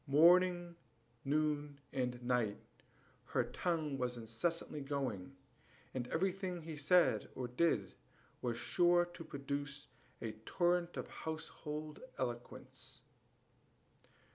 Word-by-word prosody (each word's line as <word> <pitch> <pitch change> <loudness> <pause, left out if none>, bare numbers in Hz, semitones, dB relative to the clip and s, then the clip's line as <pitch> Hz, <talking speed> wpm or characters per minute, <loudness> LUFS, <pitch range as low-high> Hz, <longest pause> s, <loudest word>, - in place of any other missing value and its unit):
Morning, 175 +4 +6 0.5
noon, 145 0 +1
and 125 -2 -1
night 120 -4 +2 0.7
her - - +1
tongue 155 -6 -1
was 125 -1 -1
incessantly 145 +7 -2
going, 135 -5 -2 0.6
and 125 -2 -2
everything 185 0 -1
he 160 -1 -5
said 170 +4 +4
or 125 - -2
did 155 +7 +2 0.5
was 120 -2 -1
sure 175 +8 +4
to 175 -1 -9
produce 140 0 -3 0.3
a 110 - -3
torrent 175 +2 +2
of - - -3
household 155 -1 -5 0.2
eloquence. 120 -2 -5
150 Hz, 100 wpm, -37 LUFS, 125-170 Hz, 0.7 s, Morning